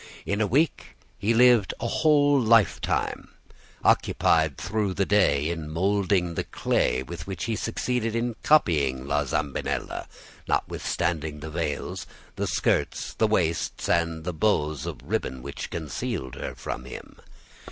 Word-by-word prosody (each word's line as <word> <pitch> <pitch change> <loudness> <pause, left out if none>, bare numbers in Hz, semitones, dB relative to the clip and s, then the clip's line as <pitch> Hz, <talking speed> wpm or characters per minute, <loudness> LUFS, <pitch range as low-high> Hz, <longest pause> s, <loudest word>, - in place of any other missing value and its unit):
In 100 +2 -1
a 105 - +2
week 150 +9 0 0.2
he 100 +4 +1
lived 120 -3 +5
a - - -3
whole 145 0 +4
lifetime, 115 -2 +2 0.6
occupied 80 -4 +3
through 105 -4 -1
the 100 - +1
day 85 -7 +3
in 80 -3 -5
molding 95 +1 +1
the - - -2
clay 65 +1 0
with 65 - -8
which 95 -4 -4
he 115 -1 -1
succeeded 115 +1 -1
in 115 0 -1
copying 70 - +3
La 70 +1 0
Zambinella, 70 +1 -2 0.4
notwithstanding 80 -3 -1
the 80 +1 -7
veils, 80 -3 -3 0.3
the - - -2
skirts, - - 0
the 110 - +2
waists, 85 -6 0
and 85 -1 +1
the 90 +1 -3
bows 75 -5 0
of 85 - -4
ribbon 65 -1 -3
which - - -6
concealed 80 - -4
her - - -6
from - - -6
him. 65 - -10
85 Hz, 140 wpm, -26 LUFS, 75-110 Hz, 0.6 s, lived